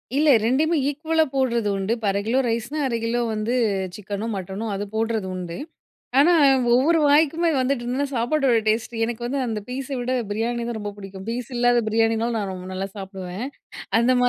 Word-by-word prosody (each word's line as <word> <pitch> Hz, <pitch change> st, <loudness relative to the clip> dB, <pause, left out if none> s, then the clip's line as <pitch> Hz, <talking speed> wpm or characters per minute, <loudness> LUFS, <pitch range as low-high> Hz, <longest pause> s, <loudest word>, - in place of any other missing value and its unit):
இல்ல 300 Hz, +2 st, +4 dB
ரெண்டையுமே 295 Hz, +8 st, +2 dB
ஈக்குவலா 315 Hz, +2 st, +1 dB
போடுறது 235 Hz, -5 st, +1 dB
உண்டு. 195 Hz, +2 st, -2 dB
இப்ப 225 Hz, -, -6 dB
1/2 200 Hz, -, 0 dB
கிலோ 240 Hz, +4 st, +2 dB
ரைஸ்ன்னா, 235 Hz, +6 st, -2 dB
1/2 235 Hz, -2 st, -1 dB
கிலோ 240 Hz, +1 st, 0 dB
வந்து 215 Hz, +3 st, -1 dB, 0.4 s
சிக்கனோ, 205 Hz, +1 st, -5 dB
மட்டனோ 190 Hz, +3 st, -5 dB
அது 200 Hz, -, -3 dB
போடுறது 225 Hz, -3 st, 0 dB
உண்டு. 175 Hz, -2 st, -5 dB, 0.6 s
ஆனா, 310 Hz, +6 st, +6 dB, 0.4 s
ஒவ்வொரு 315 Hz, +6 st, +4 dB
வாய்க்குமே 320 Hz, +3 st, +4 dB
வந்துட்டு 255 Hz, -1 st, 0 dB
இருந்ததுன்னா, 260 Hz, +4 st, -1 dB
சாப்பாடோட 250 Hz, +1 st, +2 dB
டேஸ்ட்டு 225 Hz, +1 st, 0 dB
எனக்கு 235 Hz, 0 st, -4 dB
வந்து 275 Hz, +3 st, -2 dB
அந்த 220 Hz, -2 st, -2 dB
பீஸ 260 Hz, +1 st, -4 dB
விட 245 Hz, +1 st, -2 dB, 0.2 s
பிரியாணி 235 Hz, +3 st, -1 dB
தான் 235 Hz, -2 st, -3 dB
ரொம்ப 205 Hz, -1 st, -4 dB
பிடிக்கும். 195 Hz, -1 st, -9 dB
பீஸ் 240 Hz, +1 st, -3 dB
இல்லாத 245 Hz, 0 st, +4 dB
பிரியாணினாலும் 225 Hz, +1 st, +1 dB
நான் 200 Hz, -2 st, -2 dB
ரொம்ப 185 Hz, 0 st, -7 dB
நல்லா 190 Hz, +1 st, -3 dB
சாப்பிடுவேன். 190 Hz, +1 st, -6 dB, 0.5 s
அந்தமா 250 Hz, +1 st, +4 dB
235 Hz, 170 wpm, -23 LUFS, 210-255 Hz, 0.6 s, ஆனா